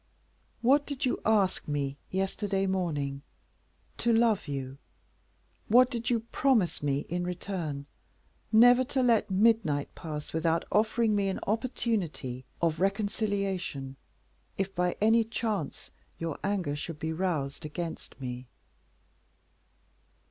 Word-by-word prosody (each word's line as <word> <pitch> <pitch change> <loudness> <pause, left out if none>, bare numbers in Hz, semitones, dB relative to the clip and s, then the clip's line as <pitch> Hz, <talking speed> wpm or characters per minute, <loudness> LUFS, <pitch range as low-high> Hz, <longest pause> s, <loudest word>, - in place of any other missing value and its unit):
"What 280 +4 +4
did 280 -2 -2
you 250 - 0
ask 205 -4 +2
me 140 -2 -1
yesterday 195 +1 -1
morning? 150 -8 -1 0.8
To 235 - +2
love 225 -3 +3
you. 135 -1 -5 0.9
What 250 +4 +6
did 235 -2 -2
you 235 -2 +2
promise 245 -10 +2
me 140 -1 0
in 175 +3 -3
return? 175 -5 -4 0.7
Never 245 +3 +7
to 260 0 0
let 230 -3 +3
midnight 190 -8 +2
pass 150 -2 -6
without 160 +1 +1
offering 220 +1 +2
me 200 -1 +1
an 190 - -2
opportunity 200 - -2 0.2
of 165 -2 +2
reconciliation, 195 -8 -1 0.6
if, 195 0 -2
by 180 0 0
any 225 +2 +5
chance, 220 - -3 0.3
your 165 -2 -4
anger 190 -7 0
should 150 +2 -5
be 160 +1 -3
roused 160 -6 -2
against 160 -1 -6
me." 125 -1 -6
190 Hz, 120 wpm, -29 LUFS, 150-220 Hz, 0.9 s, Never